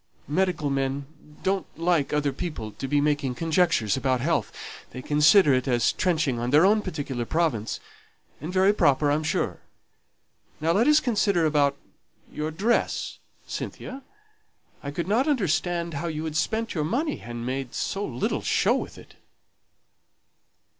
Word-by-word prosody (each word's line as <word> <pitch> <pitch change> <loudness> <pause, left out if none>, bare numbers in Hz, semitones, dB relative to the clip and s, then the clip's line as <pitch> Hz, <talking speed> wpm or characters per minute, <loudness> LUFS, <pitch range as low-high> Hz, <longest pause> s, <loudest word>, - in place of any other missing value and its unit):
Medical 165 -2 0
men 135 +1 -1 0.4
don't 190 0 0
like 165 -3 +1
other 145 -2 0
people 135 -9 -5
to 135 - -6
be 145 +2 +2
making 145 -3 0
conjectures 160 - +2
about 130 -1 0
health; 155 +3 0 0.4
they - - -8
consider 150 +2 +5
it 130 +1 0
as 120 -2 +2
trenching 150 -9 0
on 120 +1 -2
their 150 +6 +5
own 210 +2 +4
particular 145 -10 -4
province, 120 -6 -1 0.6
and 155 +4 -5
very 190 +2 +4
proper, 145 -6 +3
I'm 150 +2 +1
sure. 160 0 -1 1.0
Now 160 +2 +1
let 215 +9 +3
us 300 0 +6
consider 200 -7 +1
about 145 -2 +2 0.5
your 150 +1 -3
dress, 205 +10 -1 0.3
Cynthia; 265 +2 -6 0.8
I 140 - -5
could 165 +4 -4
not 235 +8 +2
understand 175 - 0
how 155 +4 -3
you 155 -1 -3
had 155 -1 -4
spent 220 +7 -1
your 155 -5 -1
money, 280 - -1
and 120 0 -6
made 130 0 -4
so 195 - -2
little 125 -9 -2
show - - +2
with - - -5
it." - - -15
155 Hz, 150 wpm, -25 LUFS, 140-185 Hz, 1.0 s, us